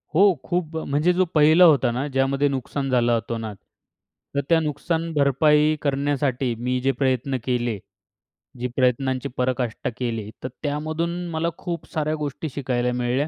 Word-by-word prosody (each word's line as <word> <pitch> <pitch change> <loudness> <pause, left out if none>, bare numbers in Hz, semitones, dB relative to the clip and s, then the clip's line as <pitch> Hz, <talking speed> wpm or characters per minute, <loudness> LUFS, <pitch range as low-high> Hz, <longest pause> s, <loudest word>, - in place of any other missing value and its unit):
हो, 185 - +5 0.2
खूप 165 0 -2
अ, - - -3
म्हणजे 150 +6 +2
जो 185 +1 +2
पहिला 155 +4 +7
होता 140 -7 +5
ना, 130 +5 -2
ज्यामध्ये 135 +1 +1
नुकसान 135 +1 -3
झालं 120 -2 +3
अतोनात. 115 -1 -4 0.8
तर 140 - +2
त्या 165 -1 +5
नुकसान 160 +2 -2
भरपाई 150 +2 +3
करण्यासाठी 140 -3 0
मी 125 +1 -1
जे 135 +1 +2
प्रयत्न 130 0 0
केले. 120 -4 -1 0.8
जी 125 - -1
प्रयत्नांची 130 0 +1
पराकाष्टा 125 -2 -1
केले, 115 -4 -3
तर 130 - -3
त्यामधून 155 +4 -2 0.2
मला 160 +1 0
खूप 170 -2 -5
साऱ्या 155 0 0
गोष्टी 150 +1 -4
शिकायला 125 -3 0
मिळाल्या. 125 +4 0
140 Hz, 150 wpm, -23 LUFS, 125-155 Hz, 0.8 s, पहिला